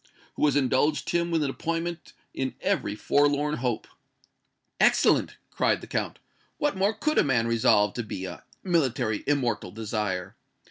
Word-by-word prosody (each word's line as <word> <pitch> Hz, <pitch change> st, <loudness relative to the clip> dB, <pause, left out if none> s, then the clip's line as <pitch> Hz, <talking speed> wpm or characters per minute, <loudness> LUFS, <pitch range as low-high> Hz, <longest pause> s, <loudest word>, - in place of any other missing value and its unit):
"Who -, -, -4 dB
has 145 Hz, -, +1 dB
indulged 145 Hz, +2 st, +1 dB
him 170 Hz, 0 st, +1 dB
with 165 Hz, -2 st, +1 dB
an 140 Hz, -, -1 dB
appointment 165 Hz, +2 st, -4 dB, 0.2 s
in 130 Hz, 0 st, -3 dB
every 185 Hz, -, -1 dB
forlorn 145 Hz, +4 st, +2 dB
hope!" 120 Hz, -2 st, -2 dB, 0.9 s
"Excellent!" -, -, +3 dB
cried -, -, +1 dB
the -, -, -8 dB
Count. -, -, -3 dB, 0.4 s
"What 295 Hz, -5 st, 0 dB
more 200 Hz, +3 st, +1 dB
could 305 Hz, +8 st, +1 dB
a -, -, +5 dB
man 125 Hz, -5 st, +2 dB
resolved 110 Hz, -3 st, +3 dB
to 120 Hz, -, -1 dB
be 95 Hz, -3 st, -5 dB
a 90 Hz, -1 st, -8 dB, 0.2 s
military 130 Hz, -, 0 dB
immortal 125 Hz, -9 st, 0 dB
desire? 105 Hz, -3 st, -3 dB
135 Hz, 150 wpm, -27 LUFS, 110-165 Hz, 0.9 s, a